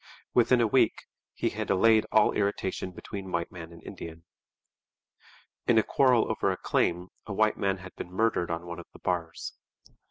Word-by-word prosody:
Within 125 0 +4
a - - +4
week 110 - +2 0.3
he - - 0
had - - -4
allayed 110 +3 +4
all 110 -1 +5
irritation 100 -2 -1
between 95 +1 -8
white 85 -1 -2
man 85 -2 -9
and 85 -1 -14
Indian. 80 0 -9 1.4
In 120 - +5
a 110 - +6
quarrel 125 -4 +3
over - - 0
a - - -1
claim 90 +2 0 0.2
a 105 - -4
white 110 +2 +3
man 100 -1 0
had 95 0 -11
been 90 - -7
murdered 105 -3 +1
on 85 +1 -3
one 85 0 -6
of 85 - -10
the - - -14
bars. 85 -2 -3
95 Hz, 180 wpm, -28 LUFS, 85-110 Hz, 1.4 s, a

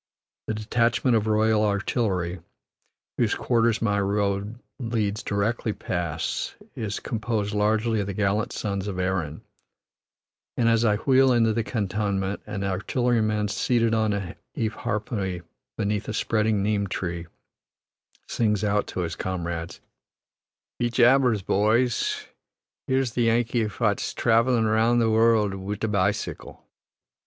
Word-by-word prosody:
The 110 - -1
detachment 115 +3 +1
of 110 -1 +1
Royal 110 0 +3
Artillery, 100 -4 0 0.8
whose - - +2
quarters 115 -2 +1
my 105 -2 +1
road 100 +2 -1 0.2
leads 110 -4 -1
directly 105 +2 -1
past, 85 -4 -3 0.2
is 105 -2 -4
composed 110 -2 -2
largely 110 +2 +1
of 100 - -2
the 100 - -4
gallant 105 +3 0
sons 100 -2 -3
of 95 -3 -4
Erin, 90 -5 -2 1.1
and 115 - +2
as 115 0 +3
I 105 -3 +3
wheel 130 +4 +4
into 115 -2 +3
the 115 +1 0
cantonment, 100 -2 -1
an 105 -2 -4
artilleryman 105 +2 0
seated 115 +1 +1
on 110 -1 +2
a 100 -2 -4 0.2
eharpoy 105 -4 -2 0.3
beneath 105 0 -1
a - - -3
spreading 110 -2 +1
neem 100 -1 0
tree, 85 -2 -4 1.0
sings 105 -3 0
out 105 0 +1
to 90 - -4
his 85 -1 -3
comrades, 85 -2 -4 1.0
"Be 120 - +1
jabbers, 120 -3 +4
bhoys; 110 +5 +1 0.6
here's 130 -2 +1
the 120 0 +1
Yankee 115 0 +1
phat's 105 +1 -1
travellin' 115 0 +3
around 110 +2 +3
the 115 -1 +3
worruld 110 -2 +3
wid 100 +2 -5
a - - +2
bicycle." 100 0 -2
105 Hz, 130 wpm, -25 LUFS, 100-115 Hz, 1.1 s, wheel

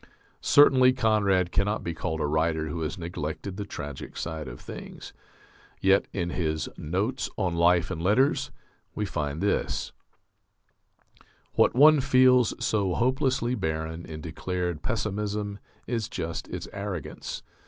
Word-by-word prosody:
Certainly 130 -3 +6
Conrad 100 -7 +2
cannot 105 +2 0
be 85 - -3
called 80 0 -3
a - - +1
writer 80 +1 0
who 80 +2 -4
has 75 +3 -3
neglected 85 +2 -5
the 100 0 -4
tragic 70 -7 -7
side 80 -3 -4
of - - -8
things. - - -9 0.7
Yet 95 +1 +3
in 85 -2 -2
his 80 -3 -1
"Notes 100 - -2
on 90 -4 0
Life 85 0 +3
and 80 - -4
Letters," 115 +10 +2 0.5
we 105 - -1
find 75 -4 -3
this: 100 - 0 1.6
What - - +3
one 150 +3 +7
feels 130 -2 +5
so 100 -5 0
hopelessly 130 -1 +1
barren 80 -5 -3
in 80 -1 -7
declared 90 +1 -3
pessimism 105 -1 -2 0.3
is 115 -3 -2
just 80 0 -4
its - - -6
arrogance. 100 -4 -5
95 Hz, 130 wpm, -27 LUFS, 80-110 Hz, 1.6 s, one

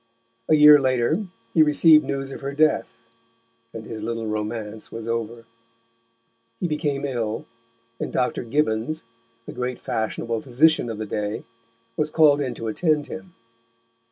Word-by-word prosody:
A 155 - +6
year 150 -1 +9
later 130 - +1 0.3
he 160 - +5
received 155 +1 +6
news 135 0 -4
of - - -8
her 140 0 -4
death, 155 +1 +1 0.7
and 110 -1 -8
his 110 -1 -7
little 115 +1 -3
romance 110 0 -4
was 115 0 -7
over. 115 0 -3 1.1
He 180 - -1
became 150 -3 -2
ill, 115 -5 -3 0.5
and - - -4
Dr. 125 -1 -1
Gibbons, 120 +2 -1 0.4
the - - -8
great 125 0 -4
fashionable 115 +1 -2
physician 140 +1 +3
of 110 - -5
the 110 - -4
day, 105 +1 -4 0.5
was 150 0 0
called 150 -2 +4
in 130 -4 -3
to 115 - -5
attend 150 +5 +1
him. 180 +3 -9
125 Hz, 145 wpm, -23 LUFS, 115-150 Hz, 1.1 s, year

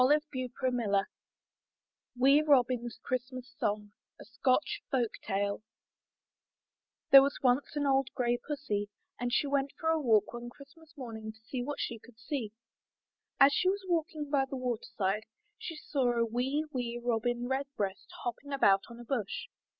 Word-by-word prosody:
162 270 -1 +2 0.2
IN 250 -1 +2
THE 235 -3 -1
NURSERY 200 -1 +2 1.1
WEE 275 +4 +6
ROBIN'S 245 -4 +3
CHRISTMAS 255 0 -4
SONG 210 0 -1 0.3
A - - -11
Scotch 255 +5 +1
Folk 245 -5 +1
Tale 200 +1 -1 1.5
There 275 - +12
was 280 +1 +1
once 255 +4 +2
an 290 -1 0
old 270 -1 +3
gray 240 -1 +1
Pussy, 210 -9 -3 0.3
and 245 0 -1
she 265 - +2
went 280 -1 0
for 320 - 0
a 320 -1 +2
walk 220 -6 +3
one 240 0 -6
Christmas 290 +5 -16
morning 220 -4 -6
to 220 - -22
see 255 - -3
what 285 +4 -3
she 230 - -3
could 240 0 -18
see. 235 -2 -4 0.9
As 275 +1 +7
she 370 - +3
was 390 0 -2
walking 310 -4 -1
by 275 -2 +3
the 270 - -4
water 250 -3 -2
side, 210 +2 0 0.3
she 330 - -6
saw 275 -5 0
a 235 -1 +2
wee, 260 +7 -1
wee 240 -2 -2
Robin 240 0 0
Redbreast 265 -8 -3
hopping 265 +4 -4
about 195 -8 +4
on 235 0 -11
a 240 - -9
bush. 230 -6 -3
250 Hz, 165 wpm, -31 LUFS, 235-280 Hz, 1.5 s, There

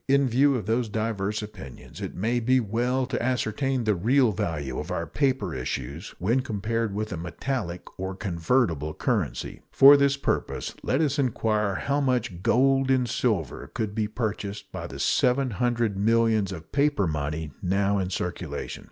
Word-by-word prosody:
In 140 0 +4
view 135 +4 +3
of 110 -6 -3
these 115 +1 0
diverse 105 -1 -2
opinions, 70 -11 -10
it - - -5
may 115 +6 0
be 130 +2 +3
well 120 +4 0
to 125 -1 -3
ascertain 130 +1 0
the 110 -1 +2
real 120 +6 +3
value 80 -10 -3
of - - -6
our - - -2
paper 130 - 0
issues 70 +5 -5
when 115 +9 +1
compared 115 -2 -2
with 110 0 -3
a - - -4
metallic 90 +2 -4 0.2
or 95 0 -3
convertible 85 - 0
currency. - - -2
For 140 +1 +9
this 140 0 +3
purpose 140 - -2
let 135 - +1
us 145 -2 +1
inquire 110 -6 +1
how 140 +1 0
much 120 -9 0
gold 135 +4 +3
and 130 -2 +3
silver 105 - -1
could 105 -2 -3
be 110 -1 0
purchased 105 -2 -4
by - - -5
the 65 - -9
seven 125 - +2
hundred 120 -1 0
millions 110 -1 +2
of 85 -3 -9
paper 140 -7 +2
money 75 -1 -3
now 100 +2 +1
in 90 -1 -1
circulation. 90 -5 -4
110 Hz, 165 wpm, -26 LUFS, 95-130 Hz, 0.2 s, For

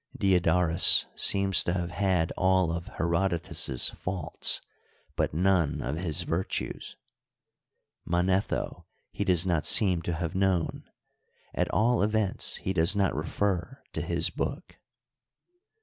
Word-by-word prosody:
Diodorus 90 -3 +4
seems 100 -1 +3
to 85 - -1
have 90 -1 -3
had 90 -3 0
all 95 -2 +2
of 85 +1 -5
Herodotus's 85 -6 0
faults 90 -4 -3 0.6
but - - 0
none 85 -2 +1
of 65 +4 -3
his 80 -3 -1
virtues. 85 +3 -4 1.1
Manetho 95 +3 -1 0.2
he - - -3
does 90 -1 +2
not 85 -4 +1
seem 95 -6 +3
to 85 +1 -3
have 80 0 -4
known; 95 -3 -1 0.6
at - - -1
all 115 +7 +1
events 105 -1 +1
he 95 - -4
does 85 +3 +3
not 100 -3 +1
refer 95 - -3
to - - -3
his - - -2
book. - - -5
90 Hz, 120 wpm, -27 LUFS, 85-95 Hz, 1.1 s, Diodorus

